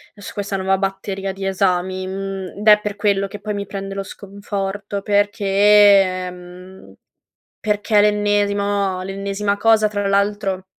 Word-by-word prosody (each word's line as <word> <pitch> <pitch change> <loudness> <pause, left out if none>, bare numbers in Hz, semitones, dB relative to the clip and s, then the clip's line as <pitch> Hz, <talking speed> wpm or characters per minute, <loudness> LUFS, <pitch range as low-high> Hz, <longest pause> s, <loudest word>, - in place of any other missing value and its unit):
su 205 -2 -10
questa 200 -1 -4
nuova 190 0 0
batteria 195 0 -3
di 195 0 -6
esami, 185 0 0
mhmm, 195 0 -6
d - - -4
è 210 0 +8
per 210 -1 -4
quello 200 -1 +1
che 200 +1 -9
poi 210 -1 -4
mi 200 -1 -4
prende 195 0 -6
lo 195 - -3
sconforto 200 0 -5
perché 205 0 0
ehm, 190 -2 +2 0.7
perché 210 0 0
è - - +7
l'ennesimo 205 -2 +1
l'ennesima 200 +1 -2
cosa. 220 0 +3
Tra 205 -1 -3
l'altro, 200 -1 0
200 Hz, 145 wpm, -19 LUFS, 195-205 Hz, 0.7 s, è